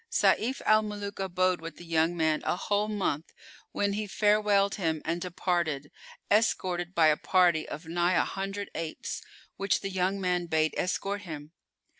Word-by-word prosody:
Sayf 255 Hz, +5 st, +2 dB
al 215 Hz, 0 st, +6 dB
Muluk 205 Hz, -1 st, -5 dB
abode 185 Hz, -2 st, +1 dB
with 165 Hz, 0 st, -7 dB
the 175 Hz, -, -11 dB
young 165 Hz, +1 st, +1 dB
man 160 Hz, -1 st, +2 dB
a -, -, 0 dB
whole 205 Hz, +3 st, 0 dB
month 190 Hz, -7 st, -2 dB, 0.4 s
when 200 Hz, 0 st, 0 dB
he 210 Hz, +1 st, -2 dB
farewelled 205 Hz, -1 st, +3 dB
him 160 Hz, -5 st, -1 dB
and 170 Hz, +2 st, -1 dB
departed, 170 Hz, -5 st, -1 dB, 0.4 s
escorted 185 Hz, -4 st, +1 dB
by 165 Hz, -, +5 dB
a 150 Hz, -, +3 dB
party 175 Hz, -4 st, +3 dB
of 155 Hz, +4 st, -7 dB
nigh 175 Hz, +2 st, +1 dB
a -, -, +4 dB
hundred 195 Hz, +1 st, -4 dB
apes, 160 Hz, -1 st, -5 dB, 0.4 s
which 195 Hz, 0 st, +1 dB
the 195 Hz, -, -4 dB
young 190 Hz, +1 st, 0 dB
man 180 Hz, -2 st, 0 dB
bade 155 Hz, -1 st, +1 dB
escort 195 Hz, +2 st, -1 dB
him. 155 Hz, -5 st, -8 dB
180 Hz, 165 wpm, -29 LUFS, 165-200 Hz, 0.4 s, al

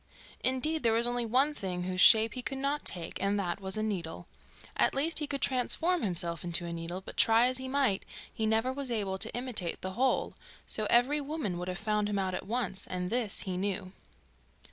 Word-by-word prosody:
Indeed, 300 Hz, +5 st, +1 dB
there 230 Hz, -2 st, +3 dB
was 230 Hz, +1 st, +2 dB
only 240 Hz, -1 st, -1 dB
one 265 Hz, +6 st, +3 dB
thing 180 Hz, -8 st, -4 dB
whose 185 Hz, 0 st, -1 dB
shape 220 Hz, -1 st, +7 dB
he 255 Hz, -, -3 dB
could 270 Hz, +2 st, -4 dB
not 280 Hz, +2 st, -1 dB
take, 170 Hz, -2 st, -4 dB
and 200 Hz, +1 st, +1 dB
that 180 Hz, 0 st, -2 dB
was 190 Hz, +2 st, -4 dB
a 215 Hz, -, 0 dB
needle. 175 Hz, -5 st, -3 dB, 0.5 s
At -, -, +2 dB
least, 310 Hz, +4 st, +2 dB
he 300 Hz, -, -2 dB
could 280 Hz, -2 st, -3 dB
transform 320 Hz, +7 st, +1 dB
himself 175 Hz, -4 st, 0 dB
into 175 Hz, 0 st, +1 dB
a 170 Hz, -, -4 dB
needle, 170 Hz, +2 st, -5 dB
but -, -, -10 dB
try 225 Hz, +1 st, +5 dB
as 255 Hz, +1 st, +1 dB
he 260 Hz, -, -5 dB
might 260 Hz, -7 st, +1 dB, 0.3 s
he 220 Hz, -, -1 dB
never 225 Hz, +4 st, +1 dB
was 275 Hz, -1 st, -4 dB
able 200 Hz, -5 st, -1 dB
to 225 Hz, -, -2 dB
imitate 240 Hz, -9 st, -2 dB
the 185 Hz, -, -4 dB
hole, 255 Hz, +6 st, +1 dB, 0.3 s
so 215 Hz, -1 st, -2 dB
every 265 Hz, +5 st, +4 dB
woman 280 Hz, -, -3 dB
would 180 Hz, -, -4 dB
have 180 Hz, -1 st, -3 dB
found 210 Hz, 0 st, 0 dB
him 205 Hz, -, -1 dB
out 190 Hz, -1 st, -1 dB
at 185 Hz, -, -4 dB
once, 225 Hz, -4 st, -2 dB
and 180 Hz, 0 st, -3 dB
this 235 Hz, -4 st, +1 dB
he 185 Hz, -2 st, -3 dB
knew. 185 Hz, -1 st, -2 dB
220 Hz, 215 wpm, -31 LUFS, 185-260 Hz, 0.5 s, shape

